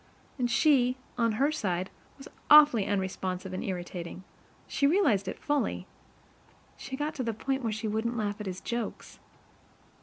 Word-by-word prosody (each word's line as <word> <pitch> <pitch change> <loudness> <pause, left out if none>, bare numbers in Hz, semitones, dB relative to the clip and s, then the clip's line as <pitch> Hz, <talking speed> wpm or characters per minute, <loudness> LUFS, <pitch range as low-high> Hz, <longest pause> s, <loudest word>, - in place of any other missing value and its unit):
And 245 -1 +1
she, 255 -1 +3 0.2
on 230 -2 +1
her 275 +7 +2
side, 185 - -2 0.3
was 270 - -11 0.2
awfully 295 -8 +7
unresponsive 190 -1 -2
and 185 - -3
irritating, 180 -1 -5 0.4
she 280 - +2
realized 260 - +2
it - - -4
fully, 290 -1 -1 0.9
she 265 - -7
got 300 +2 -2
to 265 - -3
the 230 -2 -2
point 270 +4 -2
where 230 -3 -1
she 220 +1 -3
wouldn't 220 +3 -1
laugh 205 -1 -2
at 210 - -5
his 185 -1 -5
jokes. 235 -1 -5
230 Hz, 155 wpm, -29 LUFS, 190-270 Hz, 0.9 s, awfully